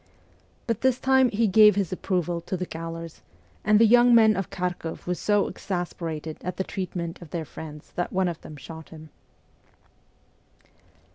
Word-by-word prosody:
But 230 -2 -2
this 260 -1 +2
time 265 -1 +4
he 225 +1 +1
gave 210 0 +6
his 200 -4 -1
approval 175 -2 -1
to 185 - -4
the 180 - -3
gaolers, 165 0 -7 0.4
and 215 0 +4
the 230 - +6
young 240 +1 +6
men 220 -2 +6
of 195 - -3
Kharkoff 180 -2 -4
were 180 - 0
so 205 +3 +1
exasperated 165 -4 -5
at 180 +1 -5
the 190 - 0
treatment 180 -3 -5
of 170 - -11
their 165 -1 -4
friends 150 0 -10
that 175 - -2
one 190 -1 +1
of 170 -2 -4
them 155 - -10
shot 160 +3 -10
him. 155 -1 -12
180 Hz, 165 wpm, -25 LUFS, 165-210 Hz, 0.4 s, gave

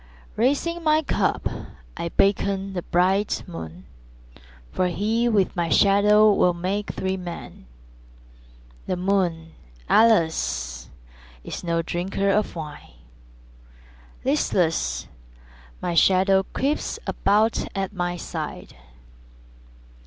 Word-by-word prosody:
Raising 290 +8 0
my 310 0 +3
cup - - 0 0.5
I 170 - -4
beckon 195 +1 +1
the 180 - -3
bright 190 +4 +1
moon, 90 - -9 0.9
For 185 - 0
he, 220 +6 0
with 200 -4 +1
my 170 -2 -1
shadow, 210 +2 +5
will 180 -3 +3
make 195 +4 -2
three 190 0 -2
men. 175 - -9 1.2
The 180 - -1
moon, 180 -4 0 0.4
alas, 65 - +2 0.5
is - - -7
no 170 -1 0
drinker 190 +4 -1
of 210 -1 0
wine; 150 - -8 1.3
Listless, 65 -3 0 0.8
my 175 - -1
shadow 190 +3 +4
creeps 285 +3 -1
about 215 +3 +1
at 195 0 -2
my 175 -2 -2
side. - - -6
190 Hz, 100 wpm, -24 LUFS, 170-205 Hz, 1.3 s, shadow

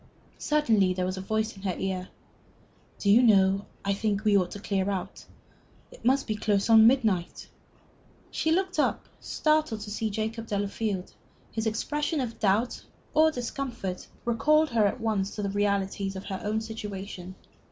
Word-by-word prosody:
Suddenly 220 -12 +2
there 180 0 -1
was 185 +1 -2
a - - -4
voice 220 +3 -1
in 195 - -13
her 190 -3 -2
ear. 185 -1 -3 0.9
"Do 200 - +2
you 225 +4 +7
know, 195 -4 +4 0.2
I 200 - +2
think 210 0 -1
we 210 -1 +4
ought 185 -3 +3
to 205 - -8
clear 195 -1 -1
out. 190 -3 -5 0.6
It - - -15
must 265 +3 +3
be 215 - -2
close 205 0 +1
on 220 0 +8
midnight." 220 -9 +1 0.8
She 320 - 0
looked 370 0 0
up, - - 0
startled, 305 -8 0
to 205 0 -7
see 220 +1 -1
Jacob 220 +2 -3
Delafield. 200 -1 -2 0.4
His 220 0 -2
expression 295 +8 -1
of 240 -4 -4
doubt 215 +4 +1 0.3
or 315 +1 +5
discomfort 240 -8 -4 0.2
recalled 305 +6 +3
her 220 -3 +4
at 200 - -3
once 215 -4 -1
to 210 - -3
the 200 - -1
realities 200 -1 -1
of 190 - -7
her 190 -2 -5
own 215 +1 -1
situation. 200 -4 -7
215 Hz, 165 wpm, -27 LUFS, 195-235 Hz, 0.9 s, on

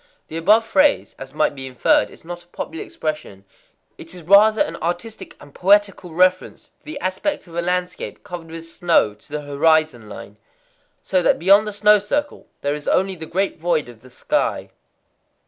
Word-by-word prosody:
The 160 - -5
above 210 +7 +4
phrase, 285 +6 +2
as 135 0 -9
might 150 +1 0
be 135 -1 -7
inferred, 125 -4 +2
is - - -17
not 175 0 -8
a - - -35
popular 160 -2 -6
expression: 150 -11 -6 0.5
it 165 +2 -11
is 175 - -11
rather 210 +5 +5
an 165 - -6
artistic 175 +7 -5
and 145 -1 -16
poetical 195 -2 +2
reference 185 +2 0
to - - -41
the 310 - -7
aspect 190 +10 -2
of 170 - -16
a 170 - -1
landscape 180 +1 -3
covered 175 -2 -8
with 165 0 -8
snow 165 -9 +1
to 105 - -19
the 150 0 -3
horizon 145 -5 +1
line,—so 105 - -7
that - - +3
beyond 200 +5 +4
the - - -3
snow 210 +1 +5
circle 290 +9 -3
there 145 0 -1
is 150 0 -7
only 190 +1 +1
the 160 -2 -9
great 190 +2 -2
void 160 -5 0
of 115 -2 -15
the 130 - -16
sky. - - -2
170 Hz, 180 wpm, -20 LUFS, 150-195 Hz, 0.5 s, rather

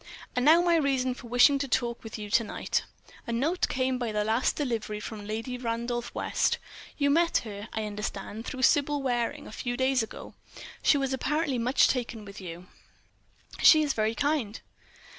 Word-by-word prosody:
"And 250 - +1
now 325 +5 +6
my 340 -1 +4
reason 265 -4 +1
for 245 -1 -11
wishing 245 +4 +5
to 280 - -2
talk 240 -1 -1
with 225 0 -7
you 210 -1 -7
to 230 - +4
night.... 210 - -2 0.4
A - - -2
note 295 +10 0
came 255 -1 0
by 240 -3 -2
the 210 0 0
last 225 +4 +1
delivery 225 -7 -2
from 210 -1 -7
Lady 225 +4 -4
Randolph 235 0 -2
West. - - +1 0.4
You 285 -1 +2
met 335 +3 +3
her, 205 0 -7
I 220 - -3
understand, 210 +1 -5
through 260 0 -4
Sybil 290 +1 +3
Waring, 240 -3 -1
a - - -10
few 245 +2 -4
days 260 -1 +2
ago. 225 - -8 0.5
She 290 - +4
was 270 -1 -1
apparently 290 -1 0
much 250 +4 +4
taken 235 -4 -2
with 200 0 -10
you." 175 0 -8 1.0
"She 310 -1 +8
is 290 -2 0
very 220 +1 0
kind." 280 -8 -1
245 Hz, 180 wpm, -28 LUFS, 220-275 Hz, 1.0 s, She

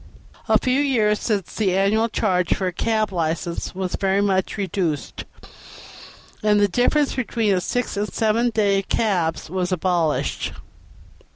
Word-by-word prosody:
* - - -26
A - - +6
few 255 +1 +1
years 220 -7 +2
since 200 -5 -2
the 190 -4 +1
annual 215 +4 +2
charge 185 -5 +1
for 190 - -3
a 180 - -1
cab 215 +2 0
license 170 0 -3
was 185 -1 -3
very 195 0 +1
much 195 -1 0
reduced, 185 -7 -3 1.2
and 210 -1 +3
the 205 - +4
difference 250 +8 +1
between 230 -4 0
the 185 - +1
six 245 +5 -2
and 210 +1 -2
seven 225 +2 +1
days' 200 -3 +1
cabs 175 -8 0
was 180 +2 -2
abolished. 175 -3 0
200 Hz, 150 wpm, -22 LUFS, 180-220 Hz, 1.2 s, A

